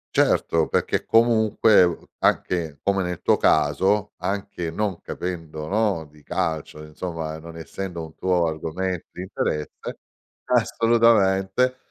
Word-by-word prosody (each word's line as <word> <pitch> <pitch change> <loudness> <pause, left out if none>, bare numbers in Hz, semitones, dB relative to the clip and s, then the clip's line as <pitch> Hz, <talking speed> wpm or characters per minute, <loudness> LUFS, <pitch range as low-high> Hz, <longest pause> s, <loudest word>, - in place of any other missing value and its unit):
Certo, 80 -1 +3
perché - - 0
comunque, 110 -3 +4
uhm, 85 -1 -1
anche 80 -6 0
come 100 -1 +1
nel 90 -1 -4
tuo - - +3
caso, 95 +8 +2
anche 95 -4 -3
non 100 -1 -2
capendo, 80 -4 -5
no, 100 -5 0
di 75 0 -20
calcio, 80 -1 -3
insomma, 80 0 -5
non 80 +1 -11
essendo 85 0 -6
un 80 -1 -11
tuo 90 -2 +1
argomento 80 +3 -3
di 90 - -8
interesse 75 -5 -4 0.5
assolutamente, 115 0 +3
90 Hz, 120 wpm, -23 LUFS, 80-100 Hz, 0.5 s, comunque